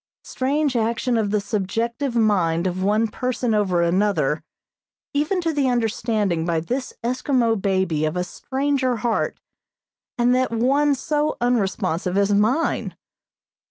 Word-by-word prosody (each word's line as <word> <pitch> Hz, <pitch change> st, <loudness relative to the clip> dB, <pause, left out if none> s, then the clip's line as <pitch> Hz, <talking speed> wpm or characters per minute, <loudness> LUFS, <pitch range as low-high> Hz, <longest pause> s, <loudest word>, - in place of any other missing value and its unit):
Strange 280 Hz, +1 st, -1 dB
action 235 Hz, +2 st, 0 dB
of 220 Hz, -3 st, +1 dB
the 210 Hz, +1 st, +1 dB
subjective 225 Hz, +6 st, -2 dB
mind 185 Hz, -7 st, +2 dB
of 185 Hz, 0 st, -2 dB
one 210 Hz, +4 st, +2 dB
person 250 Hz, +1 st, -2 dB
over 190 Hz, -5 st, +2 dB
another, 195 Hz, +4 st, +1 dB, 0.7 s
even 300 Hz, +6 st, 0 dB
to 330 Hz, -2 st, -1 dB
the 280 Hz, -3 st, +1 dB
understanding 220 Hz, -6 st, 0 dB
by 165 Hz, -1 st, 0 dB
this 250 Hz, +10 st, -3 dB
Eskimo 250 Hz, -1 st, +1 dB
baby 185 Hz, -6 st, 0 dB
of 155 Hz, +3 st, -2 dB
a 180 Hz, -, 0 dB
stranger 265 Hz, +5 st, -1 dB
heart, 230 Hz, +1 st, -1 dB, 0.8 s
and 240 Hz, 0 st, +3 dB
that 255 Hz, 0 st, +2 dB
one 275 Hz, +5 st, +2 dB
so 300 Hz, +3 st, -1 dB
unresponsive 195 Hz, -6 st, 0 dB
as 200 Hz, 0 st, +3 dB
mine. 225 Hz, +11 st, +1 dB
225 Hz, 130 wpm, -22 LUFS, 195-255 Hz, 0.8 s, and